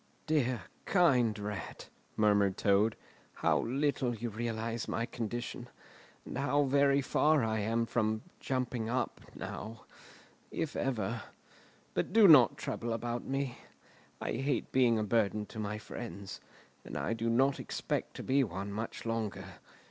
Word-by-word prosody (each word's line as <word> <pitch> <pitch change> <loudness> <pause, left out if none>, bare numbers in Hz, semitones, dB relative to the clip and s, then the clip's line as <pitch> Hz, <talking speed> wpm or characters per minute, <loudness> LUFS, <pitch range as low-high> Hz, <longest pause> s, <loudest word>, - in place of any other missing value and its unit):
"Dear, 130 - +1 0.2
kind 125 - +4
Rat," 105 -1 -6 0.3
murmured 100 -3 +3
Toad, 105 +2 +3 0.4
"how - - +2
little 135 -1 0
you 115 +1 -4
realise 115 +1 -3
my 115 - -1
condition, 120 +1 -5 0.6
and - - -5
how 145 +1 +2
very 140 0 +4
far 150 +1 +3
I 110 0 0
am 115 +3 +1
from 110 -2 0 0.2
'jumping 125 -4 -2
up' 130 +2 -1
now—if 115 +7 -8
ever! 115 -3 -1 0.7
But - - -1
do 220 -2 +8
not 145 -8 +8
trouble 115 -1 -3
about 120 +1 -3
me. 135 -2 -2 0.6
I - - -3
hate 135 +4 -1
being 125 -3 +4
a 110 - +1
burden 105 -1 +1
to 110 - -9
my 105 0 -2
friends, 100 -3 -7 0.4
and - - -6
I 110 - -1
do 115 0 -1
not 135 +4 +3
expect - - -3
to - - -6
be 135 +1 +3
one 100 -2 -4
much 110 +3 -5
longer. 115 -2 -2
115 Hz, 140 wpm, -32 LUFS, 110-130 Hz, 0.7 s, do